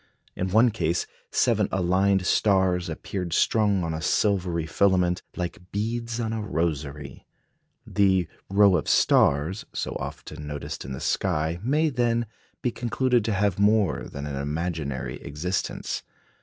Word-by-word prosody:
In 95 - -2
one 115 +5 +5
case 85 -5 0 0.2
seven - - +2
aligned 95 +1 +2
stars 95 -3 +2
appeared 85 +1 -4
strung 105 -4 +2
on 80 -1 -2
a 80 - -4
silvery 90 -3 +1
filament, 90 +1 +2
"like 90 +1 -5
beads 115 +3 -2
on 115 -1 -1
a 110 - -2
rosary." 75 -7 -3 0.6
The 95 -4 +2 0.2
"rows 100 -2 +5
of - - -4
stars," 75 +8 +3
so - - -3
often 75 - -7
noticed 75 -1 -5
in 65 - -5
the 65 - -5
sky, 80 +3 0
may, 150 +7 +2
then, 120 -3 +1 0.4
be 125 - +1
concluded 120 0 +1
to 110 - 0
have 100 -1 +1
more 105 -5 +2
than 70 0 -6
an 70 -2 -4
imaginary 70 -4 -3
existence. 80 +6 -3
95 Hz, 140 wpm, -26 LUFS, 80-105 Hz, 0.6 s, one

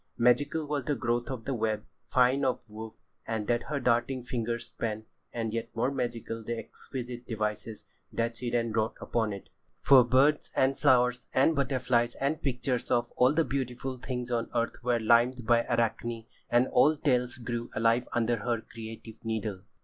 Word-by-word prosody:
Magical 145 +6 +3
was 145 -3 -2
the 145 - 0
growth 120 0 -1
of 125 -4 -5
the 135 - -1
web, 110 -3 -1 0.2
fine 130 +2 +3
of 125 -2 -1
woof, 110 +1 -8 0.3
that 115 +1 0
her 145 -1 -1
darting 125 +1 +1
fingers 120 -1 -3
span, 110 -2 -4 0.3
and 115 -2 -3
yet 115 0 -3
more 125 +4 +1
magical 120 -3 -3
the 120 +2 -3
exquisite 120 +2 -7
devices 105 0 -3 0.3
that 115 0 -1
she 120 +1 -4
then 115 -1 0
wrought 110 +1 0
upon 110 -2 -1
it. 100 -1 -8 0.3
For 135 -3 +7
birds 135 +5 +3
and 135 +1 +3
flowers 125 -3 +3
and 145 +5 +4
butterflies 125 -3 +1
and 140 +3 -1
pictures 125 -2 -1
of 120 0 +1
all 125 +3 +4
the 165 0 +3
beautiful 130 0 -3
things 125 0 -4
on 115 -1 -1
earth 115 0 -1
were 120 -1 +2
limned 120 +2 +3
by 115 0 +4
Arachne, 115 0 -1 0.2
and 120 +2 +4
old 150 +1 +4
tales 125 -4 +1
grew 120 -1 -4
alive 115 +2 +2
again - - -13
under 120 0 +2
her 115 +1 -1
creative 115 0 -10
needle. 110 -4 -3
120 Hz, 170 wpm, -29 LUFS, 115-130 Hz, 0.3 s, For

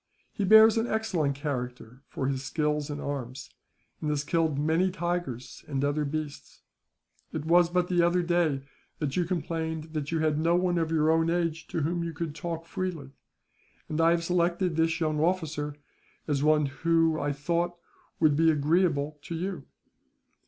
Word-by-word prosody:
He 205 - -2
bears 220 +2 +7
an 225 +1 +1
excellent 185 - 0
character 125 -3 -5
for 130 - -4
his 135 -1 -2
skill 150 +2 0
in 145 0 -4
arms, 135 -3 -5 0.5
and 150 - -1
has 150 -1 0
killed 160 -2 0
many 160 +5 +2
tigers 175 -9 -4
and 140 -1 -1
other 145 +1 0
beasts. 150 0 -6 0.7
It 155 -1 -4
was 170 +1 +5
but 180 0 +1
the 175 -1 +2
other 175 +1 +2
day 170 -6 +1 0.3
that 145 -3 -2
you 180 - +1
complained 160 -2 -3
that 150 -1 -3
you 165 - +1
had 155 -1 +1
no 165 +2 +3
one 175 -1 +1
of 165 -1 0
your 160 -1 +3
own 165 0 +2
age 165 -2 -1
to 165 - -2
whom 170 +3 -1
you 165 -1 -4
could 160 -1 -4
talk 165 +1 -5
freely; 165 -6 -4 0.8
and 155 +1 -1
I 165 - +5
have 170 0 +2
selected 175 0 +1
this 165 +1 +1
young 155 -2 0
officer 155 -4 -1 0.5
as 145 -3 0
one 150 0 +4
who, 160 +3 +1
I 145 - -1
thought, 170 +5 -1 0.4
would 155 -3 +4
be 165 +2 +4
agreeable 150 -1 +1
to 170 - -6
you." 175 -4 -4
160 Hz, 175 wpm, -28 LUFS, 145-175 Hz, 0.8 s, bears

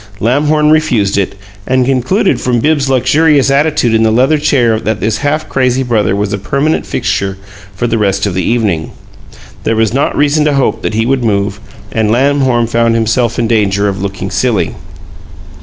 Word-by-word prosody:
Lamhorn 150 +6 +2
refused 125 -11 +1
it, 100 0 -1 0.3
and 130 0 +2
concluded 135 - 0
from 125 -1 0
Bibbs's 145 +1 +1
luxurious 140 +2 +2
attitude 140 -4 +1
in 110 - +2
the 110 - +3
leather 130 +7 +2
chair 120 -7 +1
that 110 -1 -2
this 110 0 -1
half 150 +2 -1
crazy 130 0 0
brother 110 -6 0
was 100 0 -2
a 100 - -2
permanent 140 +9 -1
fixture 95 -1 -2 0.4
for 120 - -2
the 115 -1 0
rest 100 -1 0
of 100 - -2
the 95 - -1
evening. 100 -6 -1 0.7
There 115 - 0
was 110 0 +1
not 140 +2 0
reason 150 +1 +2
to 150 -2 +1
hope 135 - 0
that 105 - -3
he 110 +1 +1
would 130 0 0
move, 100 -2 -1 0.3
and 110 -1 0
Lamhorn 130 0 +2
found 115 0 +1
himself 115 +1 0
in 120 - 0
danger 105 -3 +1
of 95 -1 -3
looking 100 0 -5
silly. - - 0
120 Hz, 180 wpm, -12 LUFS, 105-140 Hz, 0.7 s, the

